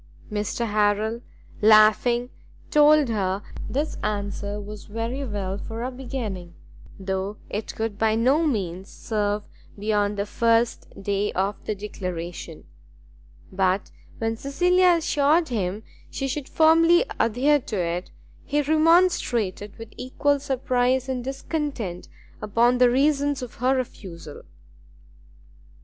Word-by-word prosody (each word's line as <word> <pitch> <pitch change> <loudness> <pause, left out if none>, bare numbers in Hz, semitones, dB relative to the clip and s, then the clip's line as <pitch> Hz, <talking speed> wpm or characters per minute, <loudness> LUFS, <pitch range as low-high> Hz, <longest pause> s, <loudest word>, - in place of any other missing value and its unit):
Mr 210 +3 -2
Harrel, 215 +2 +1 0.4
laughing, 220 +3 +5 0.4
told 300 -1 +6
her 195 -2 -1 0.3
this 290 +4 -2
answer 205 0 -3
was 210 0 -9
very 230 +5 -4
well 200 -5 -3
for 225 +3 -6
a 255 - -3
beginning, 225 -9 -6 0.4
though 190 +2 -3
it 210 +1 -4
would 220 -2 -3
by 220 -1 +3
no 265 +8 +3
means 190 - -3
serve 210 -2 -2 0.3
beyond 205 0 0
the 200 - -1
first 230 +2 +1 0.2
day 200 +1 0
of 195 +2 -2
the 215 - -2
declaration; 180 -5 -6 0.9
but 190 +1 0 0.3
when 225 0 -1
Cecilia 355 +8 +3
assured 310 0 +2
him 205 -2 -2 0.3
she 270 - -3
should 270 +1 -4
firmly 330 +5 +5
adhere 260 +6 +3
to 225 -5 -5
it, 175 +1 -2 0.3
he 295 - 0
remonstrated 310 - +2
with 225 -1 -10
equal 285 +3 0
surprise 260 -1 0
and 255 -2 -3
discontent 270 - -4 0.3
upon 235 +4 +2
the 250 -1 +6
reasons 280 +1 +1
of 245 - -7
her 260 +2 +3
refusal. 180 - -6
225 Hz, 120 wpm, -24 LUFS, 205-270 Hz, 0.9 s, told